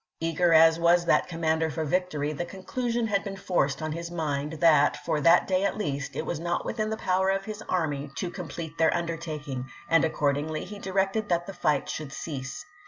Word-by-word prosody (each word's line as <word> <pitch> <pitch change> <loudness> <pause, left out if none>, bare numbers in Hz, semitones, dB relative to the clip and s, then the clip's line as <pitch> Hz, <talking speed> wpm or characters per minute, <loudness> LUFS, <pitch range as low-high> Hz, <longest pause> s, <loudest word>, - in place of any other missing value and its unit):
Eager 165 +1 +1
as 160 0 +6
was 170 +1 +4
that - - +3
commander 160 -1 0
for 160 +1 -3
victory, 155 -3 -1
the 155 - -3
conclusion 235 +6 -2
had 200 -3 0
been 195 -1 -5
forced 145 -7 0
on 155 - -2
his 170 +2 -5
mind, 150 -3 -2
that, 155 -3 +4
for 150 +1 -1
that 170 +3 +6
day 185 0 +1
at 200 - 0
least, 140 -9 -3
it - - -3
was 165 - -3
not 175 +1 -2
within 215 -1 -2
the 220 - -2
power 190 -1 +1
of 195 0 0
his 215 0 -6
army 150 -5 -1
to 180 -3 -3
complete 165 -3 -6
their 160 - +5
undertaking; 155 -6 -4 0.2
and 165 -1 +4
accordingly 150 0 0
he 205 +2 -9
directed 195 +2 0
that 175 -1 +1
the 195 - -7
fight 150 -5 0
should 150 -3 -5
cease. 135 - -6
165 Hz, 200 wpm, -27 LUFS, 150-185 Hz, 0.2 s, as